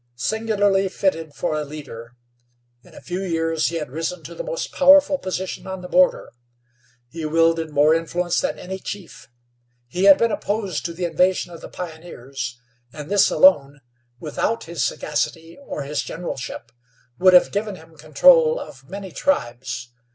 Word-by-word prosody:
Singularly 205 - +1
fitted 165 -6 -2
for 170 -3 -2
a 155 0 -1
leader, 130 -6 -10 0.7
in - - -18
a - - -11
few 180 +1 -4
years 165 -3 0
he 170 - -3
had 150 -5 -4
risen 165 +4 -4
to - - -9
the - - -6
most - - -4
powerful 285 0 +5
position 185 -2 -5
on 190 -1 -6
the - - -6
border. 275 +7 +2 0.8
He 160 +5 -8
wielded 165 +1 +2
more 150 +1 +4
influence 170 +2 0
than - - -2
any 190 +1 -6
chief. 190 -2 -8 0.6
He 180 +11 -1
had 195 -1 +9
been 230 -1 +1
opposed 205 -5 -2
to 170 - -3
the 180 +1 -2
invasion 175 +1 +1
of 165 - -11
the - - -9
pioneers, 140 -7 -7 0.3
and 150 +5 -9
this 205 -1 +5
alone, 145 - +4 0.4
without 165 +8 -2
his 170 0 -5
sagacity 165 +2 -2
or 145 - -4
his 145 +2 -2
generalship, 130 -7 -6 0.5
would 185 0 +6
have 180 - +6
given 205 0 -2
him 160 -2 -16
control 475 - +4
of 135 - -11
many 195 0 -7
tribes. 125 - -2
170 Hz, 160 wpm, -22 LUFS, 150-195 Hz, 0.8 s, had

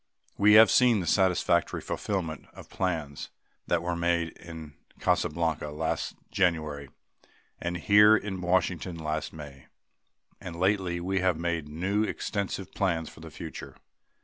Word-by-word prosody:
We 105 +1 +5
have 110 +1 +8
seen 125 -4 +5
the 90 - -3
satisfactory 90 -2 +2
fulfillment 85 -8 -4
of - - -13
plans 80 -6 -3 0.4
that 85 -1 +1
were 85 0 -1
made 85 -1 0
in 80 -3 -11 0.3
Casablanca 80 -1 0
last 80 +2 -3 0.2
January 80 -7 0 0.7
and 85 0 -3
here 105 +4 +6
in 95 -3 -5
Washington 90 -1 0
last 80 -1 -3
May. 70 -4 -11 0.7
And 85 -2 -8
lately 95 -1 0
we 95 +2 -1
have 90 -3 +1
made 85 -3 -2
new, 95 +7 -1
extensive 100 -3 -3
plans 85 -5 -1
for - - -15
the - - -10
future. - - -9
85 Hz, 135 wpm, -28 LUFS, 80-95 Hz, 0.7 s, have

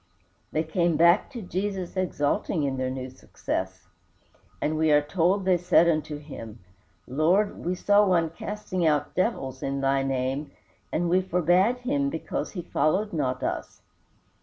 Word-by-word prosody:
They 155 - 0
came 170 0 +1
back 170 +4 +5
to 240 -5 -7
Jesus 190 0 -3
exulting 175 -1 0
in 135 -2 -1
their 130 0 -1
new 130 0 -5
success, 95 -6 -5 0.7
and 155 - -1
we 155 0 +2
are 150 - +6
told 180 +6 +1
they 185 -2 +3
said 175 -1 +4
unto 155 -2 0
him, 130 -7 -9 0.5
"Lord, 175 +10 +1
we 180 +2 -1
saw 205 +3 +4
one 170 -4 +2
casting 195 0 -4
out 150 -3 +1
devils 135 - -1
in 140 0 -2
thy 135 0 +2
name, 135 +2 -2 0.4
and 175 +2 0
we 180 +2 +3
forbade 180 +5 +2
him, 280 +2 0
because 285 0 -4
he 180 -4 -5
followed 195 +8 0
not 130 -5 -1
us." - - -4
170 Hz, 155 wpm, -26 LUFS, 145-185 Hz, 0.7 s, are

